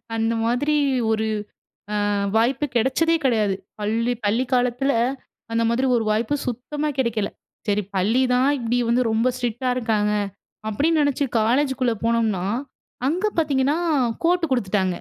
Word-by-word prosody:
அந்த 225 0 +1
மாதிரி 250 +6 +1 0.4
ஒரு 220 0 0 0.8
அ - - +1 0.3
வாய்ப்பு 250 +6 +2
கிடைச்சதே 325 +8 +2
கிடையாது. 215 -6 +2 0.3
பள்ளி 225 +3 0
பள்ளி 225 +5 +2
காலத்தில 250 +2 +2 0.6
அந்த 230 0 +1
மாதிரி 250 +3 +1
ஒரு 225 - 0
வாய்ப்பு 220 +5 +1
சுத்தமா 275 +5 -3
கிடைக்கல. 225 -5 0 0.4
சரி 205 0 +2
பள்ளி 215 +8 +2
தான் 255 +2 +3
இப்பிடி 240 0 0
வந்து 245 +2 +3
ரொம்ப 225 +2 +1
ஸ்ட்ரிக்ட்டா 245 0 -2
இருக்காங்க. 215 -4 +1 0.6
அப்பிடின்னு 305 +9 +1
நெனைச்சு 285 0 +1 0.2
காலேஜுக்குள்ள 255 +1 +1
போனோம்னா, 225 -5 +1 0.6
அங்க 360 +8 0
பாத்தீங்கன்னா, 285 -1 +2 0.5
கோட்டு 350 0 +3
குடுத்துட்டாங்க. 190 -5 +1
240 Hz, 130 wpm, -23 LUFS, 220-270 Hz, 0.8 s, தான்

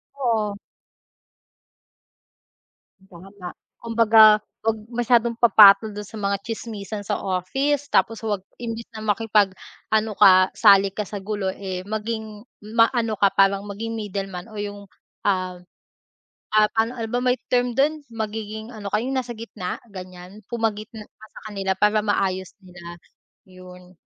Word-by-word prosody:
Oo. 220 -6 -1 2.5
Tama, 185 0 -11 0.2
kumbaga 220 -2 +5 0.2
huwag 225 0 0 0.2
masyadong 235 -1 +1
papatol 210 -2 +7
dun 210 - -5
sa 215 +2 -10
mga 200 -1 0
tsismisan 215 -2 -6
sa 205 - -3
office 270 +11 -1
tapos 225 -1 +1
huwag 205 -4 -3 0.2
imbes 230 -1 -5
na 220 - -9
makipag-ano 215 0 0
ka 185 0 +6
sali 200 -2 +5
ka 210 +1 -5
sa 200 0 -7
gulo, 205 -1 -3
eh, 190 -2 -5
maging 220 0 -5 0.3
maano 230 -1 +2
ka 200 -1 +3
parang 195 0 +3
maging 215 +3 -5
middleman 195 -2 -5
o 215 - -7
yung, 205 0 -6 0.4
ah, 185 -2 -1 0.9
ah, 215 0 +6
ano, 230 +3 0
ano 225 - -3
ba 245 - 0
may 250 0 +2
term 245 0 +2
dun, 300 +3 +1
magiging 220 -1 -5
ano 215 -4 -8
ka 210 - +2
yung 265 +2 -3
nasa 250 -2 -3
gitna? 220 -5 -6
Ganyan, 185 +2 -11
pumagitna 220 -1 -3
ka 220 - -17
sa - - -11
kanila 195 -1 -2
para 210 +1 +3
maayos 190 -4 -1
nila. 175 -1 -11 0.5
Yun. 180 0 -15
210 Hz, 135 wpm, -23 LUFS, 195-225 Hz, 2.5 s, papatol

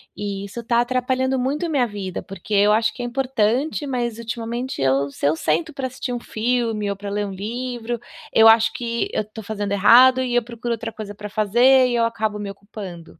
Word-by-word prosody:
e 200 -1 -4
isso 200 +4 -8
está 235 0 +2
atrapalhando 255 +1 0
muito 285 +6 -1
a - - -3
minha 260 -6 +2
vida, 195 -3 -5
porque 195 +2 -8
eu 205 +1 +5
acho 220 0 +2
que 245 - -8
é - - -2
importante, 260 +3 0
mas 240 -4 -2
ultimamente 235 - -4
eu 135 +1 +2
se - - -5
eu 150 - +3
sento 315 - -1
para 270 -2 -3
assistir 255 0 -5
um 245 - -3
filme 225 -3 -1
ou 200 - -2
para 200 +1 -7
ler 205 0 -1
um 200 - -5
livro, 240 +4 -4 0.3
eu 225 0 +7
acho 225 0 +6
que 235 -1 -2
eu - - +1
estou 215 +1 -10
fazendo 205 -1 -4
errado 245 +6 +6
e 250 -2 -1
eu 245 - +3
procuro 235 0 -4
outra 225 0 -5
coisa 205 -2 -8
pra 210 +1 -7
fazer 240 +6 +4
e 245 - -1
eu 235 - +2
acabo 220 -2 -2
me 205 -1 -5
ocupando. 195 -5 -10
230 Hz, 220 wpm, -22 LUFS, 205-250 Hz, 0.3 s, eu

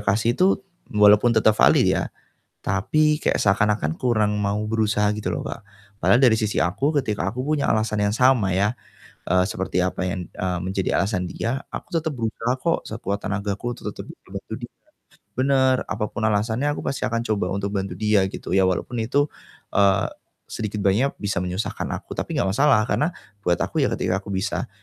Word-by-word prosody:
kasih 105 +3 +1
itu 185 +9 +3 0.3
walaupun 105 +2 +5
tetep 110 0 +5
valid - - +5
ya, - - -1 0.5
tapi 150 +11 +2
kayak - - 0
seakan-akan 100 -5 +2
kurang 110 -4 +1
mau 105 +1 0
berusaha 105 -2 +1
gitu 90 -4 -2
loh, 80 - -2
Kak. 110 - -7 0.3
Padahal 120 +4 +4
dari 120 -4 +5
sisi 105 -6 0
aku 100 - 0
ketika 105 -3 -2
aku 125 - -3
punya 145 +1 0
alasan 110 0 +1
yang 100 - +1
sama 120 -6 +3
ya, 105 +6 +1 0.5
eee, 90 0 +4
seperti 95 -2 -2
apa 90 0 0
yang, 90 -1 -3
eee, 90 -1 -3
menjadi 95 +2 -1
alasan 95 -3 -1
dia, 130 +4 -2
aku - - -8
tetep 160 -1 0
berusaha 115 -2 -2
kok 165 +5 +1
sekuat 100 -3 -3
tenagaku 100 +3 -2
untuk 120 - -6
tetep - - -7
ngebantu - - -9
dia. - - -30 0.6
Bener, 130 0 +3
apapun 105 - -3
alasannya 110 +6 +1
aku 145 - -4
pasti 140 - -3
akan 115 0 0
coba 100 -4 0
untuk 100 +1 -3
bantu 95 0 -3
dia, 105 -2 +3
gitu, - - -5
ya 95 - +5
walaupun 95 +6 0
itu, 140 +6 +2 0.5
eee, 100 -1 +4 0.4
sedikit 105 -1 -5
banyak 110 +9 +2
bisa 100 -3 -2
menyusahkan 90 +3 -3
aku, - - -10
tapi - - -3
nggak - - +2
masalah, 110 -2 +4
karena 150 +5 +1 0.3
buat 90 -3 +1
aku - - -1
ya - - +3
ketika 95 +1 0
aku 100 - -14
bisa, 100 +1 -2
105 Hz, 180 wpm, -23 LUFS, 95-120 Hz, 0.6 s, walaupun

